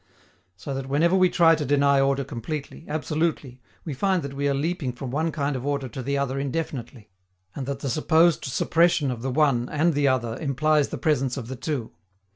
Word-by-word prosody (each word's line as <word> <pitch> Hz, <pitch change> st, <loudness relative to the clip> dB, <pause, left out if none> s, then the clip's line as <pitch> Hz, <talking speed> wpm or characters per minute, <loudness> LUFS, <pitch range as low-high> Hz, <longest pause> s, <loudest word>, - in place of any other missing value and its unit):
So 135 Hz, +9 st, -6 dB
that 135 Hz, 0 st, -5 dB
whenever 165 Hz, +6 st, +3 dB
we 185 Hz, -1 st, +4 dB
try 165 Hz, -2 st, +5 dB
to 155 Hz, -2 st, 0 dB
deny 140 Hz, 0 st, +3 dB
order 135 Hz, 0 st, +2 dB
completely, 145 Hz, +5 st, -6 dB
absolutely, 155 Hz, -4 st, -2 dB, 0.2 s
we 155 Hz, -, -3 dB
find 185 Hz, +5 st, 0 dB
that 140 Hz, 0 st, -6 dB
we 140 Hz, +1 st, -1 dB
are -, -, +1 dB
leaping 145 Hz, -3 st, -2 dB
from 125 Hz, +1 st, -6 dB
one 160 Hz, +4 st, 0 dB
kind 145 Hz, -2 st, -2 dB
of 130 Hz, -, -4 dB
order 140 Hz, -1 st, -1 dB
to 130 Hz, -, -6 dB
the 140 Hz, +3 st, -1 dB
other 135 Hz, -1 st, -1 dB
indefinitely, 135 Hz, -6 st, -5 dB, 0.4 s
and 135 Hz, -2 st, -5 dB
that 140 Hz, -1 st, -4 dB
the 140 Hz, -, -3 dB
supposed 160 Hz, +4 st, +3 dB
suppression 160 Hz, +1 st, +2 dB
of 120 Hz, -2 st, -5 dB
the 135 Hz, -, -2 dB
one 130 Hz, -3 st, +2 dB
and 160 Hz, +3 st, +2 dB
the 145 Hz, -1 st, +2 dB
other 125 Hz, -3 st, 0 dB
implies 150 Hz, +1 st, +2 dB
the -, -, -5 dB
presence 135 Hz, -5 st, 0 dB
of 120 Hz, -3 st, -6 dB
the 130 Hz, -, -4 dB
two. 130 Hz, -2 st, -4 dB
140 Hz, 205 wpm, -25 LUFS, 130-155 Hz, 0.4 s, try